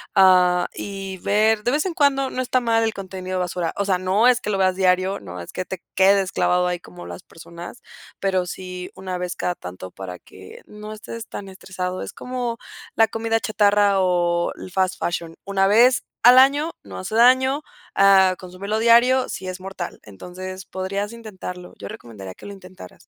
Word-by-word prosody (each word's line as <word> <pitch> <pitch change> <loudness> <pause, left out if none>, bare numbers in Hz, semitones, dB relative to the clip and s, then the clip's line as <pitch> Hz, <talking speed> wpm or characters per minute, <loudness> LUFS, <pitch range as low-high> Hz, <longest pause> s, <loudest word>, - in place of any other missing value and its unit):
ah, 180 -2 +5
y 195 -1 -6
ver 215 +3 +2
de 245 - +2
vez 300 +5 +1
en 365 - -2
cuando, 275 -3 +2
no 255 - -3
está 255 0 +1
mal 225 -1 +2
el 220 - -1
contenido 185 -1 -5
basura. 180 -1 -2
O 200 - +1
sea, 190 -2 +2
no 190 +6 +2
es 250 -1 +3
que 210 - -4
lo 200 - 0
veas 185 -1 +2
diario, 185 +1 +2
no 90 -2 -8
es 85 - -10
que 185 - -3
te 185 +1 -7
quedes 195 0 +4
clavado 180 0 +2
ahí 180 -1 -2
como 90 - -12
las 85 0 -8
personas, 170 +6 -11 0.4
pero 190 -2 +1
sí 180 0 -7
una 185 -1 -5
vez 180 0 -4
cada 180 - -1
tanto 90 - -9
para 90 -2 -8
que 95 0 -14
no 210 0 -9
estés 230 +2 -8
tan 195 -1 -7
estresado. 185 -1 -5
Es - - -7
como 245 -2 -4 0.4
la 225 -1 +4
comida 225 0 -1
chatarra 205 -2 +3
o 175 -1 +1
el 185 - -10
fast 190 0 0
fashion. 170 -1 -3
Una 195 0 +1
vez 240 +5 +4 0.2
al 250 +2 +8
año 285 +5 +4
no 95 -2 -9
hace 155 - -5
daño, 260 +4 +5 0.3
ah, 190 -1 +6
consúmelo 195 +4 -4
diario 240 +3 +5
si 185 - -6
es 185 0 -6
mortal. 190 -2 -7
Entonces, 185 - -8
podrías 195 +3 -4
intentarlo. 185 -5 -8
Yo 100 - -8
recomendaría 100 -5 -10
que - - -14
lo 205 - -7
intentaras. 185 - -13
190 Hz, 190 wpm, -22 LUFS, 180-220 Hz, 0.4 s, al